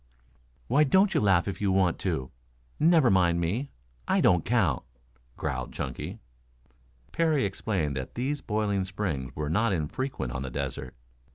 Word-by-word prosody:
"Why 140 +5 +4
don't 190 +7 +4
you - - +2
laugh 95 -4 +3
if 100 - -4
you 100 -2 +2
want 95 -2 +2
to? 80 -9 -2 0.5
Never 160 - +5
mind 85 -3 +3
me. 105 +12 -1 0.4
I - - +3
don't 85 -3 +4
count," 95 - +1 0.6
growled 65 -2 -3
Chunky. 65 -3 -5 0.9
Parry 160 -7 +2
explained 95 -7 -2
that 65 - -6
these 140 +4 -2
boiling 105 -3 0
springs 95 -9 -4
were 75 -1 -3
not 105 +7 +2
infrequent 80 - -3
on 65 +2 -4
the 65 - -4
desert. 60 - -5
95 Hz, 150 wpm, -28 LUFS, 80-120 Hz, 0.9 s, Never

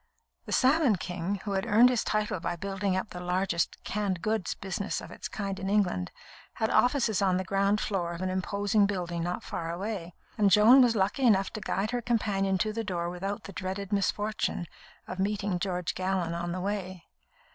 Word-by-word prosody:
"The - - -6
Salmon 270 -3 +4
King," 180 +2 -3
who 205 - -4
had 195 +3 -1
earned 230 +3 +6
his 245 -3 +1
title 210 -3 -1
by 175 - -2
building 195 +1 -2
up 190 - -3
the 180 - -6
largest 180 -1 0
"canned 195 -4 -2
goods" 215 -4 -1
business 195 +1 -3
of - - -10
its - - -6
kind 195 -2 -4
in 190 - -3
England, 190 - +1 0.4
had 220 - -1
offices 245 -6 +3
on 185 -2 +3
the 185 - -1
ground 200 +2 +1
floor 180 -6 -1
of 170 - -7
an 185 - 0
imposing 200 +2 +1
building 175 -4 -3
not 175 +1 -3
far 165 0 -4
away, 180 -1 -5 0.2
and 205 -1 +5
Joan 215 +7 +8
was 240 -2 +4
lucky 205 +6 0
enough 195 -3 +3
to 215 - -5
guide 200 +3 -1
her 245 -1 -1
companion 200 -5 +1
to 215 +3 -1
the 225 +1 -2
door 175 -4 -2
without 195 +3 -4
the 195 - -9
dreaded 190 +2 -4
misfortune 205 -1 0 0.4
of 185 - -6
meeting 200 -1 0
George 180 -2 -2
Gallon 185 -2 -1
on 170 0 -3
the 180 +1 -3
way. 185 -3 -4
195 Hz, 195 wpm, -29 LUFS, 180-210 Hz, 0.4 s, Joan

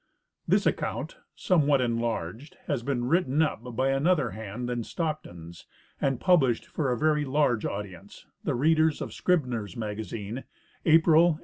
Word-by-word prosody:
This - - +3
account, - - -2 0.2
somewhat 150 -6 +3
enlarged, 115 - -2
has - - -1
been 120 -1 -1
written 150 -1 +1
up 155 - -1 0.2
by 130 +3 +2
an 135 +4 +1
other 155 -10 +2
hand 110 +4 -6
than 120 -1 -2
Stockton's 90 - -5 0.3
and 135 -3 +1
published 135 -10 +3
for 140 -5 -2
a 125 - 0
very 150 +2 +2
large 135 -5 +1
audi 100 -1 -5
ence, 95 +3 -14 0.2
the - - -1
readers 155 +3 +3
of - - -5
Scribner's 125 - -1
Magazine, 110 +2 -5 0.4
April, 160 +1 +6
1891. 160 -3 +1
130 Hz, 150 wpm, -27 LUFS, 115-155 Hz, 0.4 s, April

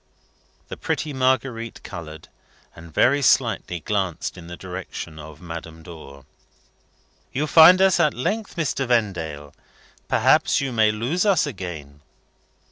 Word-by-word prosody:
The - - -7
pretty 150 - -3
Marguerite 130 -3 -1
coloured, 80 -2 -9 0.5
and 85 0 -13
very 140 - +3
slightly 90 - +1
glanced 95 -2 -2
in 85 -1 -11
the 85 0 -8
direction 90 -3 -8
of 75 0 -11
Madame 80 -1 -9
Dor. 75 -6 -12 1.1
"You 145 +4 -1
find 165 +4 +8
us 190 -2 +4
at 155 -3 +2
length, 205 - -3
Mr. 140 -5 -2
Vendale. 85 - -2 0.5
Perhaps - - +3
you 135 -1 -2
may 110 -2 +3
lose 120 +12 -1
us 200 -4 +3
again." 80 - -8
100 Hz, 125 wpm, -22 LUFS, 80-135 Hz, 1.1 s, find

